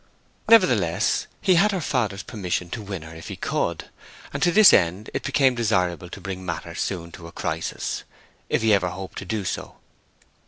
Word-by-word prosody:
Nevertheless, 115 Hz, -, +4 dB
he 190 Hz, -, +4 dB
had 195 Hz, +5 st, +4 dB
her 195 Hz, -, -1 dB
father's 110 Hz, -, -1 dB
permission 90 Hz, -4 st, -3 dB
to 115 Hz, -, -4 dB
win 95 Hz, -5 st, -6 dB
her 80 Hz, 0 st, -10 dB
if 80 Hz, -, -10 dB
he -, -, -5 dB
could; -, -, -2 dB, 0.4 s
and -, -, -4 dB
to 175 Hz, -, +4 dB
this 215 Hz, +3 st, +8 dB
end 90 Hz, +3 st, +2 dB
it -, -, -2 dB
became 135 Hz, -1 st, +3 dB
desirable 90 Hz, -7 st, 0 dB
to 100 Hz, -, -8 dB
bring 95 Hz, 0 st, -6 dB
matters 90 Hz, -, -4 dB
soon 85 Hz, -3 st, -3 dB
to 85 Hz, -, -10 dB
a -, -, -11 dB
crisis, 80 Hz, 0 st, -3 dB, 0.5 s
if -, -, +1 dB
he 110 Hz, -1 st, +4 dB
ever 90 Hz, -3 st, +2 dB
hoped 95 Hz, +1 st, -7 dB
to -, -, -8 dB
do 105 Hz, +1 st, -3 dB
so. -, -, -4 dB
95 Hz, 190 wpm, -24 LUFS, 90-120 Hz, 0.5 s, this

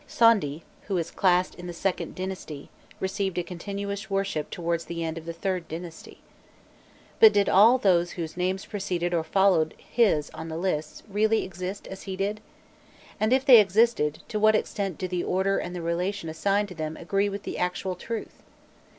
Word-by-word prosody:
Sondi, 195 Hz, -10 st, +3 dB, 0.2 s
who 195 Hz, -3 st, 0 dB
is 170 Hz, -1 st, -2 dB
classed 180 Hz, -1 st, +2 dB
in 175 Hz, 0 st, -9 dB
the 175 Hz, -, -5 dB
IInd 185 Hz, +2 st, -2 dB
dynasty, 185 Hz, -6 st, -6 dB, 0.3 s
received 190 Hz, -1 st, -2 dB
a 175 Hz, -, +1 dB
continuous 200 Hz, +4 st, -5 dB
worship 195 Hz, -6 st, -1 dB
towards 170 Hz, -1 st, -2 dB
the 170 Hz, -1 st, -4 dB
end 160 Hz, -1 st, -3 dB
of 165 Hz, -1 st, -8 dB
the 170 Hz, -, -3 dB
IIIrd 180 Hz, -1 st, -2 dB
dynasty. 165 Hz, +1 st, -9 dB, 1.0 s
But 220 Hz, -1 st, +9 dB
did 205 Hz, -1 st, +3 dB
all 225 Hz, +6 st, +6 dB
those 175 Hz, -6 st, +2 dB
whose 165 Hz, -3 st, -5 dB
names 185 Hz, +2 st, -1 dB
preceded 180 Hz, -4 st, -2 dB
or 165 Hz, -2 st, +1 dB
followed 180 Hz, -4 st, +2 dB
his 200 Hz, -11 st, +1 dB
on 165 Hz, -, -7 dB
the 160 Hz, -, -4 dB
lists, 160 Hz, -4 st, -2 dB
really 215 Hz, +2 st, +2 dB
exist 185 Hz, +2 st, -6 dB
as 195 Hz, -, -8 dB
he 190 Hz, -, -3 dB
did? 205 Hz, +3 st, -2 dB, 0.8 s
and 215 Hz, +2 st, +1 dB
if 260 Hz, +1 st, +3 dB
they 255 Hz, -5 st, +10 dB
existed, 200 Hz, -7 st, +2 dB
to 215 Hz, -, -2 dB
what 215 Hz, +1 st, +5 dB
extent 195 Hz, -4 st, -2 dB
do 185 Hz, -, -3 dB
the 180 Hz, -1 st, -2 dB
order 190 Hz, +2 st, +1 dB
and 180 Hz, +1 st, -5 dB
the 175 Hz, -, -5 dB
relation 170 Hz, +1 st, -2 dB
assigned 200 Hz, +5 st, 0 dB
to -, -, -8 dB
them 155 Hz, -1 st, -5 dB
agree 195 Hz, +4 st, 0 dB
with 200 Hz, 0 st, -6 dB
the -, -, -5 dB
actual 180 Hz, +1 st, -1 dB
truth? 220 Hz, +5 st, -6 dB
185 Hz, 185 wpm, -26 LUFS, 170-200 Hz, 1.0 s, they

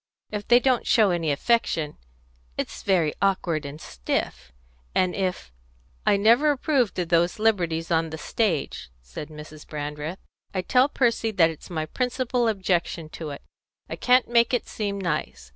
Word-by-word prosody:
If 210 Hz, -1 st, -4 dB
they 240 Hz, 0 st, +7 dB
don't 255 Hz, -1 st, +1 dB
show 210 Hz, -4 st, +4 dB
any 165 Hz, -3 st, 0 dB
affection 160 Hz, -3 st, 0 dB, 0.6 s
it's -, -, -4 dB
very 175 Hz, -6 st, +2 dB
awkward 175 Hz, -6 st, 0 dB
and 145 Hz, +2 st, -8 dB
stiff; 60 Hz, -, -3 dB, 0.4 s
and 185 Hz, -1 st, +2 dB
if 185 Hz, -, -3 dB, 0.3 s
" -, -, -35 dB
"I 200 Hz, -, +5 dB
never 235 Hz, +9 st, +5 dB
approved 275 Hz, -5 st, +1 dB
of 175 Hz, -2 st, -2 dB
those 170 Hz, +1 st, +2 dB
liberties 175 Hz, -7 st, 0 dB
on 165 Hz, 0 st, +2 dB
the 160 Hz, -, -6 dB
stage," 155 Hz, -, -1 dB
said 60 Hz, -, -8 dB
Mrs. 150 Hz, 0 st, -11 dB
Brandreth. 150 Hz, +3 st, -5 dB, 0.4 s
"I 185 Hz, -, 0 dB
tell 255 Hz, +8 st, +3 dB
Percy 235 Hz, -4 st, +1 dB
that 170 Hz, -6 st, +3 dB
it's 160 Hz, -, -12 dB
my 160 Hz, -3 st, -2 dB
principal 250 Hz, +4 st, -1 dB
objection 180 Hz, -6 st, -1 dB
to 160 Hz, -1 st, -7 dB
it. 140 Hz, -, -8 dB, 0.5 s
I -, -, -2 dB
can't 250 Hz, 0 st, +3 dB
make 235 Hz, +1 st, +3 dB
it 245 Hz, -, -3 dB
seem 200 Hz, -2 st, -3 dB
nice. 155 Hz, -, -3 dB
180 Hz, 160 wpm, -25 LUFS, 155-225 Hz, 0.6 s, they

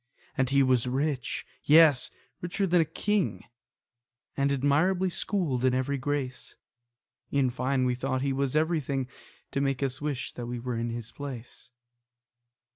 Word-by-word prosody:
And 130 Hz, -2 st, +1 dB
he 140 Hz, 0 st, +4 dB
was 130 Hz, -2 st, +2 dB
rich, 135 Hz, 0 st, -1 dB, 0.2 s
yes, 150 Hz, -4 st, +6 dB, 0.3 s
richer 180 Hz, +3 st, -1 dB
than 175 Hz, -2 st, +4 dB
a -, -, +2 dB
king, 200 Hz, +5 st, -1 dB, 0.9 s
And 140 Hz, 0 st, +1 dB
admirably 160 Hz, +7 st, +2 dB
schooled 165 Hz, -, -1 dB
in 130 Hz, -1 st, +3 dB
every 135 Hz, +2 st, -1 dB
grace: 135 Hz, -1 st, -3 dB, 0.7 s
In 135 Hz, -3 st, +2 dB
fine, 130 Hz, +1 st, 0 dB
we 125 Hz, -, +2 dB
thought 130 Hz, +1 st, -2 dB
that -, -, -1 dB
he 135 Hz, -, +1 dB
was 135 Hz, 0 st, -1 dB
everything 155 Hz, -5 st, 0 dB, 0.4 s
To 140 Hz, -, -1 dB
make 135 Hz, -1 st, 0 dB
us 130 Hz, 0 st, -2 dB
wish 145 Hz, -4 st, -3 dB
that 120 Hz, -1 st, -6 dB
we 120 Hz, 0 st, -4 dB
were 125 Hz, 0 st, -3 dB
in 115 Hz, +1 st, -2 dB
his 115 Hz, -1 st, -6 dB
place. 130 Hz, -5 st, -8 dB
135 Hz, 155 wpm, -28 LUFS, 125-150 Hz, 0.9 s, yes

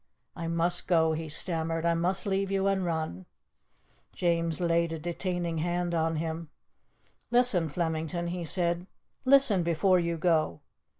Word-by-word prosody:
"I 165 Hz, -1 st, -4 dB
must 170 Hz, +1 st, 0 dB
go," 160 Hz, -2 st, +3 dB
he 160 Hz, 0 st, -4 dB
stammered. 165 Hz, 0 st, -2 dB
"I 170 Hz, -, +3 dB
must 175 Hz, +3 st, -1 dB
leave 195 Hz, -1 st, 0 dB
you 195 Hz, 0 st, 0 dB
and 195 Hz, -1 st, +1 dB
run." 160 Hz, -, -3 dB, 0.9 s
James 170 Hz, -2 st, 0 dB
laid 170 Hz, -1 st, +1 dB
a -, -, -3 dB
detaining 170 Hz, 0 st, -3 dB
hand 175 Hz, +1 st, -1 dB
on 165 Hz, 0 st, +1 dB
him. 160 Hz, 0 st, -4 dB, 0.8 s
"Listen, 240 Hz, -10 st, +3 dB
Flemington," 165 Hz, +2 st, -2 dB
he 175 Hz, 0 st, -4 dB
said. 175 Hz, +1 st, 0 dB, 0.4 s
"Listen 260 Hz, -8 st, +5 dB
before 175 Hz, +3 st, +3 dB
you 170 Hz, -1 st, -1 dB
go. 155 Hz, -, +1 dB
170 Hz, 140 wpm, -29 LUFS, 165-180 Hz, 0.9 s, Listen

